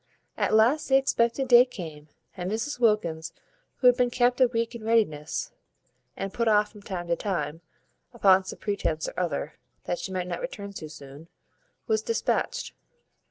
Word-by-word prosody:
At - - +1
last 245 +9 +3
the 265 - +5
expected 265 -1 +1
day 245 -1 +8
came, 160 -11 -9 0.3
and 180 0 -4
Mrs 235 +6 -3
Wilkins, 170 -8 +1 0.4
who - - -5
had 250 -1 +8
been 250 -1 +2
kept 245 +1 +2
a 255 - +7
week 230 0 -2
in 235 -2 -8
readiness, 210 -10 0 0.7
and 195 0 -4
put 235 -1 0
off 210 -1 +3
from 210 - -14
time 185 -3 -5
to 170 - +3
time, 165 -5 -3 0.5
upon 190 -1 +4
some 185 - -7
pretence 170 -6 -2
or - - -6
other, 155 -4 -3 0.2
that 175 - -3
she 190 - -5
might 185 -1 -2
not 180 - -4
return 200 - -6
too 155 -5 -7
soon, 145 +1 -12 0.6
was 440 0 +1
dispatched. - - -1
210 Hz, 170 wpm, -27 LUFS, 170-245 Hz, 0.7 s, day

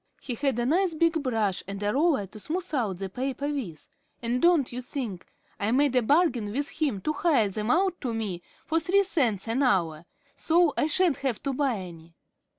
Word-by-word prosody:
He 250 - -5
had 270 +1 0
a 240 - 0
nice 340 +5 +2
big 330 0 +2
brush 220 -8 0
and 200 +1 -5
a 205 0 +1
roller 290 - +2
to 205 +3 -12
smooth 345 - -4
out 220 -10 0
the 195 +1 -4
paper 260 +7 -3
with, 245 - -5 0.3
and 240 +1 -1
don't 340 -7 +4
you 250 - -4
think, 235 -8 -5 0.3
I 205 0 0
made 275 +1 +3
a 250 - +5
bargain 250 - +2
with 285 +5 -1
him 265 -11 0
to 305 - -1
hire 285 -10 +2
them 210 +3 -3
out 365 +4 +2
to 250 - -2
me 210 -6 -3 0.2
for 325 0 +1
three 380 +4 +3
cents 240 - 0
an 230 +5 0
hour, 170 - +1 0.3
so 335 -1 +3
I - - +1
sha'n't 340 -2 +2
have 260 -5 -2
to 275 - -1
buy 270 -2 +1
any." 170 -3 -10
255 Hz, 205 wpm, -27 LUFS, 210-305 Hz, 0.3 s, a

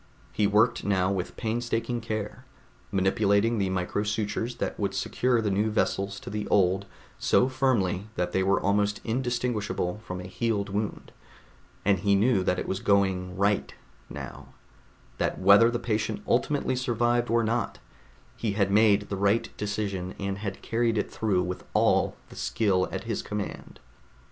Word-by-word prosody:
He 105 - +2
worked 105 +2 +3
now 95 -1 +1
with 95 -2 -3
painstaking 120 +1 -2
care, 110 +2 -4 0.5
manipulating 100 +3 +2
the 95 -1 +1
micro 95 +2 -1
sutures 105 +3 -2
that - - -3
would - - -1
secure 125 -2 +1
the 105 - 0
new 105 +3 +1
vessels 100 -1 -1
to - - -8
the 105 0 -3
old 95 0 +2 0.3
so 125 - +3
firmly 115 -8 0
that 90 0 -1
they 95 - +1
were 95 +1 +2
almost 105 +1 +1
indistinguishable 115 -6 -1
from 90 -4 -6
a - - -6
healed 100 +2 -2
wound, 105 +1 -3 0.7
and 100 -2 +3
he 100 +1 +3
knew 105 0 +3
that 90 0 +1
it - - -3
was 95 - -2
going 95 -3 +1
right 100 +1 +1 0.3
now, - - -8 0.7
that - - 0
whether 100 +5 +6
the 120 - -1
patient 115 - -2
ultimately 145 -3 +1
survived 120 -1 +1
or 115 0 +3
not, 115 +2 -1 0.6
he 110 -3 -2
had 100 -1 +1
made 105 0 +5
the 100 - -5
right 100 +3 +1
decision 100 -3 -3
and 100 0 -3
had 100 -2 -5
carried 115 -1 +1
it - - -1
through 100 -5 +1
with 90 0 -5
all - - +3
the - - -12
skill 95 -4 +1
at - - -4
his - - -2
command. 105 -1 -6
105 Hz, 160 wpm, -27 LUFS, 95-115 Hz, 0.7 s, whether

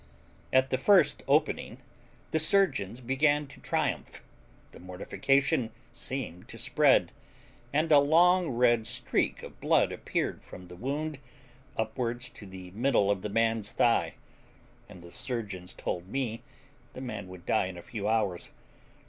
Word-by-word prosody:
At 130 0 +3
the 130 - +1
first 170 -3 +4
opening 150 +3 +1 0.5
the 160 - +2
surgeons 145 - +2
began 145 +4 +2
to 140 - -15
triumph; - - -2 0.5
the - - -14
mortification 115 +8 0 0.2
seemed 120 -7 -4
to - - -10
spread, - - +3 0.6
and 155 +3 +1
a 145 - +8
long 175 +5 +4
red 120 -2 +2
streak 120 0 0
of - - -11
blood - - +3
appeared - - -3
from 90 -1 -12
the 90 - -10
wound 145 - -3 0.6
upwards 120 +2 -2
to 100 - -12
the 95 -1 -10
middle 105 -2 +2
of 100 -2 -1
the 105 - -4
man's 115 0 +1
thigh, - - +2 0.7
and 90 - -12
the 85 - -12
surgeons 100 -8 -5
told 90 0 -4
me 115 0 -3 0.5
the - - -8
man 110 -7 -6
would 90 -1 -12
die - - +1
in 95 -1 -8
a 85 - -9
few 105 -3 -5
hours. 105 -5 0
120 Hz, 145 wpm, -29 LUFS, 100-140 Hz, 0.7 s, a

